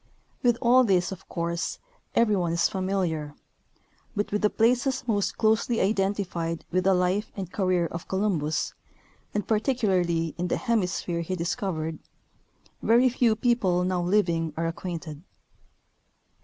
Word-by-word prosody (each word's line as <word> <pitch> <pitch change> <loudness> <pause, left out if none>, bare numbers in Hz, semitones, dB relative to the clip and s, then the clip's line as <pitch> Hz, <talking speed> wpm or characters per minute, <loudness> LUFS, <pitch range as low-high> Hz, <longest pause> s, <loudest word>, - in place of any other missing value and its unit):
With 240 -2 +3
all 250 +2 +6
this, 185 -5 +2
of 190 -1 -9
course, 170 0 -2 0.4
every 220 -3 +4
one 175 -3 0
is 170 0 +3
familiar; 180 -6 -2 0.8
but 205 0 -1
with 210 - 0
the 210 - +4
places 250 +5 +1
most 205 -4 0
closely 220 +1 +2
identified 190 -4 -1
with 185 +1 +1
the 190 -1 +5
life 185 +4 0
and 185 -3 -5
career 185 -3 +1
of 170 0 -6
Colum 190 -2 0
bus, 150 +2 -2 0.6
and 210 - -1
particularly 190 - +1
in 180 - 0
the - - 0
hemisphere 185 -6 -1
he 185 +3 -3
discovered, 170 -3 -2 0.8
very 240 +3 +5
few 240 -2 +2
people 210 -7 +2
now 180 -1 0
living 175 -4 +1
are 165 - 0
acquainted. 165 -3 -5
185 Hz, 140 wpm, -26 LUFS, 170-215 Hz, 0.8 s, all